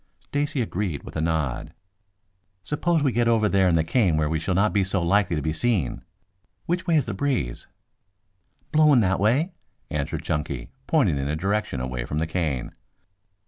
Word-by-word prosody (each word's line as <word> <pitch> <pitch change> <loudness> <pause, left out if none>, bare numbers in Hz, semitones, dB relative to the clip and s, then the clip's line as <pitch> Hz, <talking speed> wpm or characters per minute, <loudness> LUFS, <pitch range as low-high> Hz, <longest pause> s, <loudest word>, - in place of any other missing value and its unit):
Stacy 145 -1 -2
agreed 95 -8 -3
with - - -10
a 80 - -1
nod. 80 -5 -2 0.9
"Suppose 160 +1 0
we 135 - +2
get 120 0 +1
over 115 -2 +3
there 95 -2 +3
in 85 - +3
the 80 - +3
cane 90 -3 +2
where 75 -1 +1
we 80 +1 0
shall 90 +3 -1
not 105 +3 +2
be 100 -2 +3
so 95 +1 -1
likely 95 0 +2
to 75 - -2
be 80 - 0
seen. 90 - 0 0.6
Which 180 +2 -2
way 170 - +3
is 150 - +3
the 110 - -4
breeze?" 115 - -2 1.0
"Blowing 150 -5 +5
that 95 -2 +1
way," 130 - +2 0.4
answered 75 -2 -2
Chunky, 70 -5 -3 0.2
pointing 105 - +2
in 70 - -2
a 75 - -1
direction 100 -3 -1
away 60 -1 -3
from 75 - -4
the 80 - +1
cane. 80 -6 -2
95 Hz, 185 wpm, -25 LUFS, 80-120 Hz, 1.0 s, Blowing